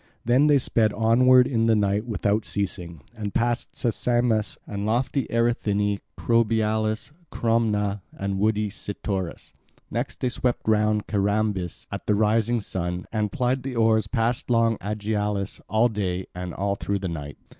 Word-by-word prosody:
Then 125 +5 +4
they 145 -1 +6
sped 110 -5 +1
onward 125 +4 +5
in 115 -3 +1
the 115 - +4
night 105 +2 +1
without 105 0 0
ceasing, 90 -7 -4
and 105 -3 -5
passed 120 0 0
Sesamus 120 -2 0
and 100 -1 -5
lofty 125 +5 0
Erythini, 105 -4 +1 0.2
Crobialus, 110 0 +1 0.2
Cromna 105 -3 0
and 100 0 -3
woody 105 0 +1
Cytorus. 95 -3 -5 0.4
Next - - -3
they 125 - 0
swept 125 -2 -2
round 105 -1 +2
Carambis 100 -3 -1
at - - -6
the 105 - +3
rising 110 +2 +2
of 115 - -1
the - - -7
sun, 90 -1 -3
and 105 -2 0
plied 130 -1 0
the 130 -1 -5
oars 110 -2 +3
past 115 +2 -1
long 115 -2 +3
Aegialus, 105 -1 -2
all 110 +4 +4
day 95 -5 -2
and 90 0 -6
on 100 +1 -1
through 100 0 -1
the 95 -1 -4
night. 75 -4 -6
110 Hz, 155 wpm, -25 LUFS, 100-115 Hz, 0.4 s, they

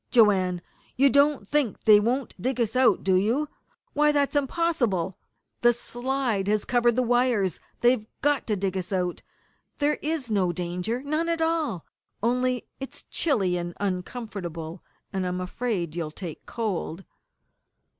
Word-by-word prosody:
"Joanne, 190 -7 +4 0.3
you 275 +1 +5
don't 280 -5 +3
think 285 -6 0
they 210 -1 +8
won't 245 +5 -1
dig 255 +3 -1
us 235 0 0
out, 250 -6 +4
do 190 - +2
you? 225 +11 +2 0.5
Why, 300 +1 +4
that's 285 0 +1
impossible! 265 - 0 0.4
The 240 0 +6
slide 240 -3 -2
has 210 0 +1
covered 240 -2 +3
the 255 - +2
wires. 240 - +2 0.2
They've 240 -3 +3 0.2
got 290 -1 +2
to 215 - +1
dig 195 -1 -2
us 185 0 -3
out! 180 -2 -1 0.6
There 295 +1 +1
is 300 -6 -2
no 190 -4 +2
danger 180 +8 -3
none 310 +4 0
at 335 -1 0
all. 320 - 0 0.4
Only 250 +1 +1
it's 270 - -7
chilly, 195 - +1
and 175 0 -4
uncomfortable, 180 -4 -4 0.3
and 190 -1 -1
I'm 180 0 -2
afraid 185 -3 -2
you'll 165 -3 -2
take 165 0 -8
cold!" 195 -5 -3
230 Hz, 145 wpm, -26 LUFS, 185-265 Hz, 0.6 s, they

